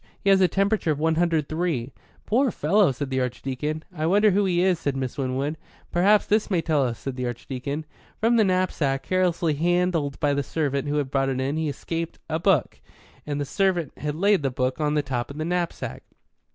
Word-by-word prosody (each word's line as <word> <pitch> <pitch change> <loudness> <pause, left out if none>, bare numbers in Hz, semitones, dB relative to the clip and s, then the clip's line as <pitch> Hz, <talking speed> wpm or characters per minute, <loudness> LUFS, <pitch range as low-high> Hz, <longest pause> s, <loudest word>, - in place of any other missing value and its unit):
He 200 - +2
has 190 -1 +5
a 185 - +6
temperature 200 -1 +1
of 150 - +1
103." 160 -4 0 0.3
"Poor 260 +5 +2
fellow!" 195 -1 +3
said 135 +1 -5
the 130 - +1
Archdeacon. 135 +5 -3
"I 155 0 -1
wonder 205 +4 +4
who 200 +2 +2
he 180 -1 +2
is," 185 -3 +2
said 140 -2 -2
Miss 130 -2 -3
Winwood. 135 +3 -2 0.3
"Perhaps 200 +4 +4
this 215 +1 +1
may 185 -4 +2
tell 155 -4 +1
us," 120 -3 -2
said 130 +2 -6
the 125 -1 -2
Archdeacon. 135 +5 -5 0.3
From 230 +2 +3
the 225 - +5
knapsack, 185 -8 0
carelessly 175 -3 +1
handled 170 -2 0
by 145 -2 +2
the 140 - +1
servant 140 -1 -2
who 145 - -1
had 140 -3 -1
brought 135 -1 +1
it 130 -1 -1
in, 135 +3 -1
had 160 0 -1
escaped 165 +3 -4
a 160 0 -1
book, 175 -6 +1 0.5
and 145 -1 -2
the 145 - -1
servant 175 -1 0
had 150 0 -3
laid 200 +2 +3
the 135 - 0
book 130 +3 -2
on 150 0 +1
the 150 - +2
top 125 -3 -3
of 140 - -8
the 155 - -2
knapsack. 175 0 -2
155 Hz, 205 wpm, -25 LUFS, 135-180 Hz, 0.5 s, a